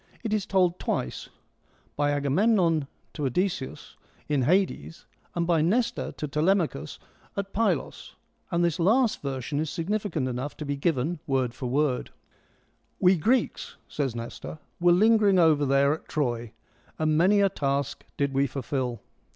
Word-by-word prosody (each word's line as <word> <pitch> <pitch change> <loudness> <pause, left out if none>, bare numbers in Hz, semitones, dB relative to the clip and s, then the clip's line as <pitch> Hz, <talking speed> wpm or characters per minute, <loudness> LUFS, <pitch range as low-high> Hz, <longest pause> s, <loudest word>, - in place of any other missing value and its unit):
It 225 - -2
is^tokU 190 -4 +1
twice 60 - -3 0.3
— - - -37
by 145 0 +1
Agamemnon 160 +2 +2 0.3
to 150 - -3
Odysseus 175 -1 -3 0.3
in 145 -2 +1
Hades, 175 +3 0 0.3
and 170 -1 0
by 165 -2 +2
Nestor 225 +9 0
to 150 - -5
Telemachus 155 - 0 0.4
at 195 0 -3
Pylos, 200 -8 -1 0.3
and 175 0 +1
this 170 +1 -1
last 225 +7 +3
version 140 +1 -3
is 155 0 -1
significant 180 -4 -2
enough 130 +3 -4
to 150 - -5
be 145 0 -2
given 155 +2 0
word 130 -4 0
for 125 +1 -5
word: 130 0 0 0.9
We 185 0 +5
Greeks 230 +9 0
(says 135 -5 -2
Nestor) 115 +6 -7 0.2
were 175 0 +5
lingering 205 +1 +5
over 155 -4 +4
there 140 +1 +4
at 160 - -8
Troy, 120 -6 -2 0.5
and 155 -1 +1
many 190 +6 +4
a 200 - +5
task 140 -4 -2
did 140 -1 0
we 135 +1 +2
fulfil. 130 -2 -3
155 Hz, 145 wpm, -27 LUFS, 140-185 Hz, 0.9 s, We